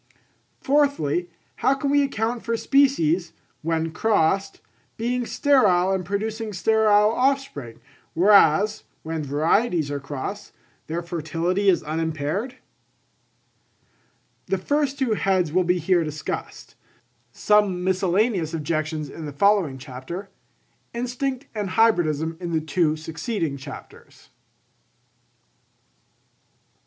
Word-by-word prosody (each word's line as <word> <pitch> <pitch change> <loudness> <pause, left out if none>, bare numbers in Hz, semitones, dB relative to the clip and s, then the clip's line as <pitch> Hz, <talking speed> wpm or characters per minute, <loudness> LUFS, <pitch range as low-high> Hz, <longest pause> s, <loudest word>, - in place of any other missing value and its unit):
Fourthly, 270 - +1 0.3
how 275 - +2
can 280 0 -2
we 285 0 +4
account 235 -4 -1
for 230 0 -2
species, 220 - +2 0.3
when 165 0 -1
crossed, 195 0 +1 0.4
being 245 +1 -1
sterile 195 -10 +3
and 190 -1 0
producing 215 +3 -3
sterile 210 +1 +3
offspring, 250 - -1 0.4
whereas, 200 +2 +4 0.2
when 160 -1 -3
varieties 155 - +1
are 145 - -2
crossed, 140 -1 -6 0.3
their 170 +2 -3
fertility 170 +4 -1
is 175 -3 +2
unimpaired? 160 - -3 1.9
The 195 - 0
two 180 - -12
first 285 -1 0
heads 195 - +1
will 185 +1 +3
be 180 +1 +1
here 175 +1 +2
discussed; 155 0 -6 0.6
some 205 +1 +2
miscellaneous 185 -1 +1
objections 155 0 -2
in 155 +2 -8
the - - -5
following 185 -3 +2
chapter; 135 +9 -8 0.6
Instinct 250 +2 -3
and 210 -3 -3
Hybridism 165 -7 +2
in 175 -2 -4
the 160 - +2
two 155 0 +1
succeeding 160 - -3
chapters. 135 - -12
185 Hz, 105 wpm, -23 LUFS, 160-220 Hz, 1.9 s, we